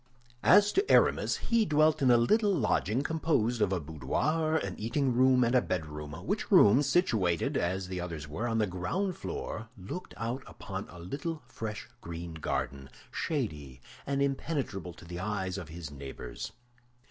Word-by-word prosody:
As 205 Hz, +2 st, +6 dB
to 395 Hz, +2 st, +1 dB
Aramis, -, -, +4 dB
he 230 Hz, -1 st, +2 dB
dwelt 155 Hz, -4 st, +3 dB
in 130 Hz, -, +4 dB
a 120 Hz, -, +7 dB
little 205 Hz, -, +3 dB
lodging 125 Hz, -, +1 dB
composed 145 Hz, -8 st, +1 dB
of 100 Hz, -2 st, +3 dB
a 95 Hz, -, +1 dB
boudoir, 145 Hz, -, 0 dB
an -, -, -1 dB
eating 125 Hz, +4 st, 0 dB
room, 130 Hz, +1 st, +5 dB
and 120 Hz, +1 st, +2 dB
a 125 Hz, -, +5 dB
bedroom, 75 Hz, -6 st, -4 dB
which -, -, -1 dB
room, 110 Hz, +7 st, +7 dB
situated, 110 Hz, -, +2 dB
as 95 Hz, +2 st, 0 dB
the 90 Hz, -1 st, -4 dB
others 80 Hz, -4 st, -5 dB
were, 100 Hz, +11 st, -3 dB
on 115 Hz, -1 st, 0 dB
the 110 Hz, -, +3 dB
ground 135 Hz, -, -2 dB
floor, 110 Hz, +1 st, -5 dB
looked 95 Hz, -, -7 dB
out 115 Hz, +5 st, -3 dB
upon -, -, -6 dB
a 90 Hz, -, -11 dB
little 145 Hz, -, -5 dB
fresh 110 Hz, -1 st, -6 dB
green 85 Hz, 0 st, -6 dB
garden, 70 Hz, -4 st, -3 dB, 0.2 s
shady 75 Hz, -, -3 dB, 0.3 s
and 140 Hz, 0 st, +1 dB
impenetrable 135 Hz, -, -2 dB
to -, -, -13 dB
the 85 Hz, +1 st, -6 dB
eyes 95 Hz, -1 st, -2 dB
of 85 Hz, -5 st, -8 dB
his 80 Hz, -2 st, -7 dB
neighbors. 70 Hz, -1 st, -7 dB
110 Hz, 165 wpm, -30 LUFS, 85-140 Hz, 0.3 s, a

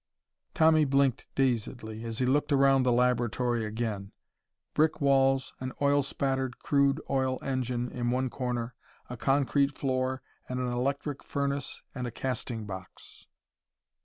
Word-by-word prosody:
Tommy 160 Hz, -1 st, +5 dB
blinked 135 Hz, -2 st, +2 dB
dazedly 115 Hz, -3 st, -1 dB
as 115 Hz, -1 st, -4 dB
he 130 Hz, -, +1 dB
looked 145 Hz, +4 st, +1 dB
around 135 Hz, -1 st, +5 dB
the 125 Hz, -1 st, +2 dB
laboratory 120 Hz, -1 st, +1 dB
again. 105 Hz, -2 st, -3 dB, 0.6 s
Brick 155 Hz, 0 st, +2 dB
walls, 135 Hz, -2 st, +3 dB
an 130 Hz, 0 st, -4 dB
oil 145 Hz, 0 st, +3 dB
spattered 135 Hz, -2 st, -1 dB
crude 140 Hz, 0 st, +2 dB
oil 130 Hz, -1 st, +1 dB
engine 125 Hz, -2 st, -1 dB
in 120 Hz, -1 st, -2 dB
one 130 Hz, +2 st, +1 dB
corner, 125 Hz, -2 st, -3 dB, 0.4 s
a -, -, -4 dB
concrete 140 Hz, +2 st, +1 dB
floor 130 Hz, -1 st, -1 dB, 0.3 s
and 125 Hz, 0 st, -2 dB
an 125 Hz, -, -1 dB
electric 140 Hz, +3 st, -2 dB
furnace 140 Hz, 0 st, -3 dB
and 125 Hz, -2 st, -4 dB
a -, -, -5 dB
casting 120 Hz, -3 st, -3 dB
box.... 95 Hz, -2 st, -9 dB
130 Hz, 135 wpm, -29 LUFS, 120-140 Hz, 0.6 s, Tommy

